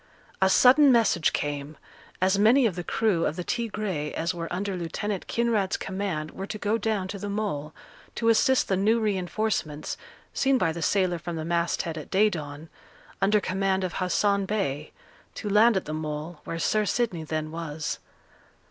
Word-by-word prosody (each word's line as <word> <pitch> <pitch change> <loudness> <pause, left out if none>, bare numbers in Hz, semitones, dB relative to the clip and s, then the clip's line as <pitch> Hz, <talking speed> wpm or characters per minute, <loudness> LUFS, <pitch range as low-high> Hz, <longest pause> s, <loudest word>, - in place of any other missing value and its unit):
A 190 - +5
sudden 270 +7 +6
message 225 -9 +3
came; 145 +1 -3 0.5
as 190 +1 +3
many 240 +5 +5
of 205 -7 +1
the 175 - -4
crew 200 -1 +1
of 150 - 0
the 180 - -4
Tigre 205 -9 -2
as 170 +3 -1
were 165 -1 -5
under 195 +2 -2
Lieutenant 185 +3 -3
Kinraid's 225 -5 +1
command 190 -6 -3
were 195 - -6
to 215 - -5
go 210 +2 0
down 210 -3 -1
to 200 0 -5
the 205 - -4
Mole, 200 -8 -3 0.4
to 230 - +1
assist 265 +3 +4
the 190 - +1
new 215 +5 +3
reinforcements 195 -6 -2 0.4
(seen 270 0 +2
by 185 -8 +1
the 165 +1 -6
sailor 185 -2 +1
from 170 +1 -5
the 160 -1 -4
masthead 170 -1 -1
at 150 - -10
day 210 +2 +3
dawn), 150 -2 -6 0.5
under 210 +2 +4
command 190 0 0
of 180 -2 -2
Hassan 200 +2 +1
Bey, 150 -9 -2 0.4
to - - -5
land 215 +1 +5
at 190 - -2
the 155 - -4
Mole, 155 +1 -5
where 165 - -4
Sir 215 +5 +1
Sidney 195 -6 -1
then 155 0 -3
was. 160 -2 -4
190 Hz, 175 wpm, -26 LUFS, 165-215 Hz, 0.5 s, sudden